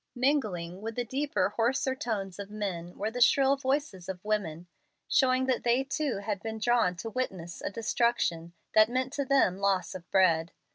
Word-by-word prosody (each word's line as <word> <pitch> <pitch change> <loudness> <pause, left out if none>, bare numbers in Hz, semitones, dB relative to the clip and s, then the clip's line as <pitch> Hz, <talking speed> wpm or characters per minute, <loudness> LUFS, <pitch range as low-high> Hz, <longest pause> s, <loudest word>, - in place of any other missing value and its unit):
Mingling 210 - 0
with 225 +1 -5
the 245 - -2
deeper, 275 -1 0
hoarser 260 +3 +1
tones 205 -7 -4
of 200 0 -6
men 185 -5 -5
were 215 +2 -2
the 245 +2 -4
shrill 270 +2 +5
voices 270 - -2
of 185 +1 -6
women, 180 -6 -2 0.4
showing 260 -1 +3
that 260 -2 0
they 240 +2 +3
too 280 -3 -2
had 205 -3 -2
been 220 -1 -4
drawn 225 -5 +2
to 225 +6 -6
witness 185 -9 -4
a - - -2
destruction 215 -6 0 0.2
that 215 +1 +6
meant 255 +2 -1
to 280 -1 -1
them 255 -9 +3
loss 195 -3 +1
of 180 -1 -10
bread. 170 -3 +3
220 Hz, 180 wpm, -29 LUFS, 185-255 Hz, 0.4 s, that